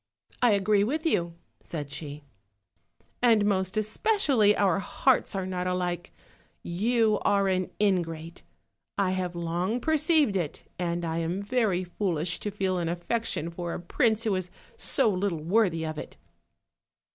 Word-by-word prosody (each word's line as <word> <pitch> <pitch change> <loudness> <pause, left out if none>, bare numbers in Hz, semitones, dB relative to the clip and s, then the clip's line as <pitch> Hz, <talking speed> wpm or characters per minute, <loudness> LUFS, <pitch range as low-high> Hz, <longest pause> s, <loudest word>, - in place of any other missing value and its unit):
"I 245 -3 +5
agree 200 0 +3
with 300 +9 -2
you," 170 - +1 0.3
said 145 -4 -6
she; 145 0 -7 1.0
"and 225 -4 +4
most 190 -1 0
especially 220 - +2
our 195 -3 +3
hearts 255 +3 +1
are 190 -1 -1
not 180 -1 -3
alike. 180 -1 -2 0.5
You 215 +4 +1
are 200 -1 +2
an 185 -1 0
ingrate; 170 -5 -1 0.6
I 195 -2 +2
have 180 -2 -2
long 175 +7 -1
perceived 310 - +2
it, 170 -6 -3 0.2
and 170 -1 -1
I 165 0 -1
am 170 +4 -2
very 205 -5 +1
foolish 175 -2 -2
to 210 - -3
feel 190 -2 -1
an 170 -1 -1
affection 175 -1 -2
for 170 0 -4
a - - -5
prince 220 +5 +1
who 220 -4 +1
is 185 -1 -2 0.3
so - - +2
little 185 -5 -1
worthy 175 -3 +2
of 155 -1 -4
it." - - -9
185 Hz, 145 wpm, -27 LUFS, 170-215 Hz, 1.0 s, I